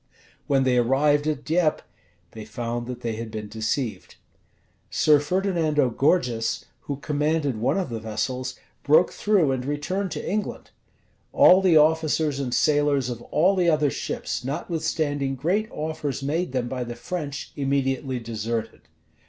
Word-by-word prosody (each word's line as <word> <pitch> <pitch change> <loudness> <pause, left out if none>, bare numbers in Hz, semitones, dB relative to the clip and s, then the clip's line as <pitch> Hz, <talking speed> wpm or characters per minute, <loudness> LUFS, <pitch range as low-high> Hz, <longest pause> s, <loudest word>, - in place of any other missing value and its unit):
When 135 -2 +3
they 130 -1 +2
arrived 145 +5 +3
at 150 -2 -2
Dieppe, 160 -1 +1 0.5
they 110 - -8
found 120 +1 -4
that 125 -1 -6
they 115 -2 -3
had 115 0 -5
been 110 -1 -6
deceived. 110 -1 -3 0.7
Sir 150 -1 +4
Ferdinando 155 -4 +1
Gorges, 120 -5 +1 0.2
who 140 - -3
commanded 150 -2 -1
one 115 - +1
of 185 -7 -2
the 115 -1 -4
vessels, 125 +4 -3 0.3
broke 160 +5 +4
through 195 -9 +2
and 130 -1 -2
returned 150 +8 -2
to - - -5
England. 210 +3 -3 0.6
All 185 +1 +7
the 180 -4 +5
officers 155 -2 +2
and 130 -3 -2
sailors 145 -2 +2
of 120 -1 -6
all 180 +10 +2
the 180 -2 +3
other 150 -3 +2
ships, - - -4
notwithstanding 145 -1 -2
great 185 - 0
offers 150 - -4
made 160 +3 -1
them 125 -2 -1
by 125 0 -3
the 120 0 -6
French, 145 +1 -5
immediately 135 -1 -1
deserted. 115 -1 -4
140 Hz, 145 wpm, -24 LUFS, 125-155 Hz, 0.7 s, All